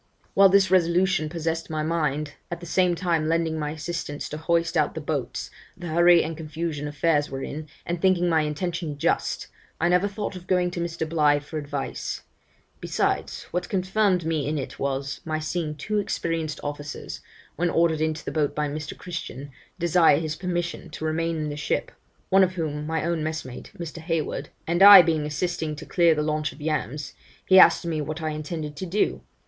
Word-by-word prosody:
'While 195 0 +7
this 190 -1 +4
resolution 175 -2 +3
possessed 165 0 -3
my 155 -1 -2
mind, 150 -2 -1 0.2
at 175 - -4
the 175 - -9
same 180 +1 +2
time 165 -3 0
lending 165 -1 0
my 150 -1 -2
assistance 155 -1 -4
to 150 - -5
hoist 170 +1 0
out 150 -3 +1
the - - -3
boats, 145 -5 -3 0.3
the 175 -1 -6
hurry 170 +1 +6
and 160 +1 -4
confusion 155 -1 -4
affairs 145 0 +1
were 135 0 -5
in, 155 +1 -6 0.2
and 175 0 -3
thinking 185 -2 +3
my 165 -2 +3
intention 155 0 -3
just, 160 +4 0 0.3
I 175 - +2
never 180 +3 +3
thought 205 -1 -4
of 180 0 -10
going 180 -1 +2
to 175 - -5
Mr. 170 -1 -3
Bligh 150 -2 +3
for 150 +2 -6
advice; 145 -2 -4 0.6
besides, - - -1
what 180 0 -2
confirmed 190 -2 +1
me 155 -4 0
in 155 +1 -1
it 135 - -6
was, 140 0 -2
my 155 -1 -2
seeing 155 0 -3
two 210 +9 -1
experienced 165 -5 -2
officers, 145 0 -6 0.4
when 175 +2 +1
ordered 165 -2 +2
into 160 0 -1
the - - -3
boat 150 -2 0
by 150 0 0
Mr. 150 +1 -5
Christian, 145 -6 -7 0.3
desire 170 -3 +4
his 155 -1 -2
permission 175 -1 -3
to 155 - -6
remain 165 +1 0
in 155 -1 -2
the 145 - -4
ship 150 - -2 0.4
(one 190 0 +6
of 185 0 +1
whom, 150 -4 -3
my 160 -1 -1
own 170 -2 0
messmate, 155 -5 -5
Mr. 170 -1 -6
Hayward), 165 -1 -2 0.2
and 170 +2 0
I 200 -2 +12
being 160 -3 0
assisting 155 0 -2
to 155 +2 -9
clear 170 -2 +4
the 150 - 0
launch 155 0 -1
of - - -16
yams, 150 -2 -3 0.3
he 190 0 +7
asked 185 - +6
me 160 -2 -1
what 155 +2 -4
I 160 -1 -2
intended 150 0 -5
to 185 - -4
do? 200 +5 0
160 Hz, 190 wpm, -25 LUFS, 150-175 Hz, 0.6 s, I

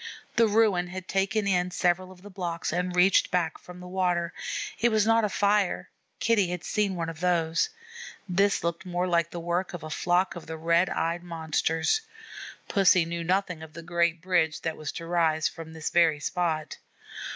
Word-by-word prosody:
The 230 -1 +5
ruin 205 -4 +3
had 185 +1 -7
taken 195 +2 0
in 180 -2 +1
several 180 +1 0
of 185 0 -16
the 205 - -11
blocks 170 -4 -3
and 180 +1 -1
reached 180 +2 +4
back 170 -3 -1
from 180 0 -12
the 180 - -9
water. 180 -2 0 0.5
It 240 - +4
was 215 -2 +2
not 225 0 +4
a 210 - +1
fire; 200 -1 +1 0.3
Kitty 215 -4 +3
had 175 -1 -4
seen 205 -3 0
one 165 -2 -3
of 165 -1 -7
those 165 -2 +1
things. 465 +1 -14 0.2
This 200 0 +3
looked 170 +1 -2
more 180 -1 -1
like 170 -2 +1
the 175 - -6
work 175 +2 -2
of 170 - -8
a 155 - -7
flock 180 +4 +1
of 175 - -9
the 160 0 -5
Red 170 +3 +2
eyed 170 +1 -1
Monsters. 165 - 0 0.7
Pussy 185 -3 +4
knew 170 0 -4
nothing 180 -1 0
of 160 -1 -10
the 165 0 -9
great 170 0 0
bridge 170 -5 +1
that 160 -1 -2
was 155 - -5
to 165 - -6
rise 165 -2 +2
from 165 -1 -8
this 160 -1 -4
very 165 -3 +4
spot. 155 -1 -2
175 Hz, 195 wpm, -27 LUFS, 165-190 Hz, 0.7 s, The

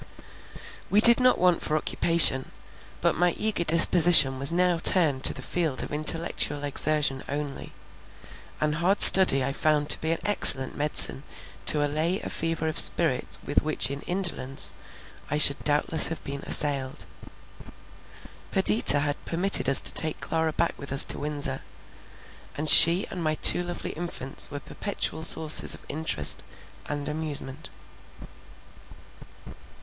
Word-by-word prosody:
We 205 - 0
did 235 +2 +8
not 255 0 0
want 180 -2 -2
for 155 - -4
occupation; 155 -4 +3 0.5
but - - -2
my 175 0 -3
eager 215 -5 -3
disposition 165 -4 +3
was 140 +3 +1
now 175 0 -3
turned 155 -7 +2
to - - 0
the 130 - -11
field 160 -5 -4
of - - -12
intellectual 150 -1 -3
exertion 145 -1 -1
only; 145 -1 -9 0.9
and 150 0 -4
hard 195 +4 -3
study 180 -9 +7
I 135 +1 -6
found 150 0 -2
to - - +2
be 160 - -4
an 165 - -3
excellent 135 -10 +6
medicine 145 -2 +2 0.5
to 150 -1 +3
allay 160 +6 -5
a - - -10
fever 165 -1 -6
of 155 - -5
spirit - - 0
with - - -3
which - - -1
in 140 0 -10
indolence, 170 -8 -1 0.6
I 150 - -4
should 140 -2 +2
doubtless 150 +2 +1
have 165 - -9
been 140 0 -9
assailed. 140 -3 -2 1.4
Perdita 120 +6 +1
had 145 0 -6
permitted 175 -3 0
us 135 - +7
to - - -4
take 155 -1 +1
Clara 160 -1 -5
back 170 +2 -4
with 140 - -10
us 140 - +5
to - - -5
Windsor; 145 -1 -4 1.0
and 155 +2 -6
she 170 +4 +5
and 180 -3 -9
my 155 -1 -4
two 175 - +4
lovely 175 0 -9
infants 160 -5 -6
were 145 - -10
perpetual 160 +1 -6
sources 160 -1 +2
of - - -20
interest 145 - -1 0.4
and 145 -1 -8
amusement. 150 -2 -9
155 Hz, 145 wpm, -22 LUFS, 140-170 Hz, 1.4 s, did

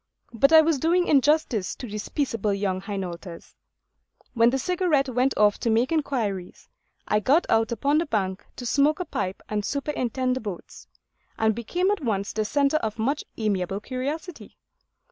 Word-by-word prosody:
But 275 +6 +3
I 320 -1 +9
was 315 -3 +1
doing 350 +5 +2
injustice 280 -8 +2
to 250 - -8
these 210 -1 -6
peaceable 230 -8 -1
young 190 -2 -1
Hainaulters. 185 -3 -7 0.8
When 230 0 +5
the 265 - 0
Cigarette 315 -3 +1
went 255 +2 +1
off 210 -1 +4
to 235 - -1
make 230 +5 +2
inquiries, 230 - -2 0.4
I 210 - +2
got 280 - +3
out 225 0 +2
upon 280 +6 +1
the 335 - -2
bank 190 -6 -2
to 245 - -7
smoke 285 +6 +2
a 360 - -2
pipe 190 - -4
and 210 -1 -2
superintend 255 -2 -1
the 260 - -4
boats, 205 -5 -8 0.5
and 220 0 +2
became 350 - -1
at 415 - -1
once 200 -5 -1
the 215 0 -1
centre 280 +5 +2
of 220 -6 -3
much 270 +7 -1
amiable 195 -3 -1
curiosity. 285 - -6
240 Hz, 165 wpm, -25 LUFS, 210-290 Hz, 0.8 s, I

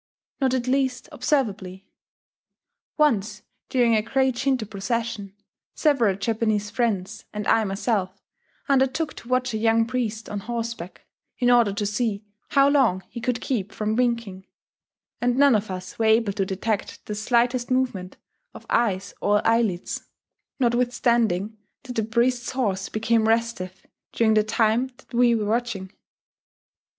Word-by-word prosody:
Not 260 -2 +2
at 245 -2 -1
least 260 -2 0
observably.... 200 -8 -1 1.1
Once, 215 -8 +1 0.3
during 240 -3 +3
a 215 - +3
great 265 +3 +1
Shinto 260 -2 0
procession, 210 -1 -3 0.4
several 245 - +2
Japanese 210 0 -1
friends, 210 -5 -2
and 210 -1 -4
I 225 - +4
myself, 195 -1 -1 0.5
undertook 280 +3 +1
to - - -11
watch 255 0 0
a 220 - -1
young 225 0 +3
priest 230 -2 -3
on 210 - -4
horseback, 230 -4 -5 0.3
in 245 -1 +3
order 235 -4 +5
to 205 +1 -2
see 210 0 -1 0.2
how 275 0 +5
long 255 -10 +3
he 235 - -7
could 245 0 -1
keep 215 -6 -2
from 215 0 -2
winking; 230 -6 -1 0.7
and 245 0 +1
none 280 -1 +6
of 215 -1 0
us 185 +2 -7
were 225 - +2
able 220 -2 +3
to 195 -1 -1
detect 200 +2 -3
the 210 - -4
slightest 240 +3 +1
movement 245 -8 -1 0.4
of - - -11
eyes 200 -4 +1
or 205 0 +2
eyelids, 225 -6 0 0.5
notwithstanding 235 -4 +1 0.2
that 250 -2 -8
the 225 - +1
priest's 240 +3 0
horse 200 -7 -1
became 220 0 +1
restive 225 -5 -1 0.3
during 220 -1 +3
the 215 0 +4
time 225 +3 +1
that 270 - -21
we 240 0 +4
were 215 -2 -1
watching. 215 -4 -2
230 Hz, 140 wpm, -24 LUFS, 205-245 Hz, 1.1 s, none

